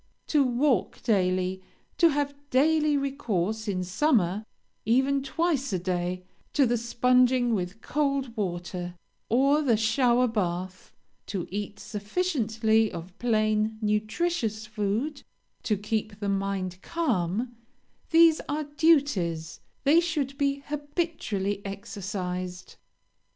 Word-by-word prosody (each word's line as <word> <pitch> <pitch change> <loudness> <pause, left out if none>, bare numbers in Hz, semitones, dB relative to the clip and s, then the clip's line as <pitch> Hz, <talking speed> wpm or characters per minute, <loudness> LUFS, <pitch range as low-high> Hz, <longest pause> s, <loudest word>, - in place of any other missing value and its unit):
To 295 -3 +4
walk 250 -3 +1
daily; 185 -2 +1 0.4
to 335 - +7
have 285 -1 0 0.2
daily 300 +2 +3
recourse, 220 -7 -2
in 185 -3 -1
summer, 200 - +1 0.4
even 265 +4 +2
twice 280 -1 0
a - - +2
day, 180 0 -2 0.3
to 280 - +4
the 240 0 +2
sponging 245 +1 +3
with 195 +2 -3
cold 275 -5 -1
water, 175 -3 -4 0.3
or 275 +6 +4
the 245 -7 +3
shower 240 +3 +3
bath; 185 -4 -3 0.4
to 190 -5 -3
eat 205 +1 -4
sufficiently 220 - 0
of 175 +2 -8
plain, 215 -2 +1
nutritious 220 +2 -1
food; 215 +7 -2 0.4
to 210 - 0
keep 210 0 -3
the 205 -1 -2
mind 195 -2 -2
calm 240 - -1 0.5
these 330 -1 +6
are 305 +1 -1
duties; 280 - +1 0.2
they 295 +4 +6
should 300 -6 -1
be 280 0 0
habitually 290 - -2
exercised. 185 -3 -5
220 Hz, 110 wpm, -27 LUFS, 195-280 Hz, 0.5 s, to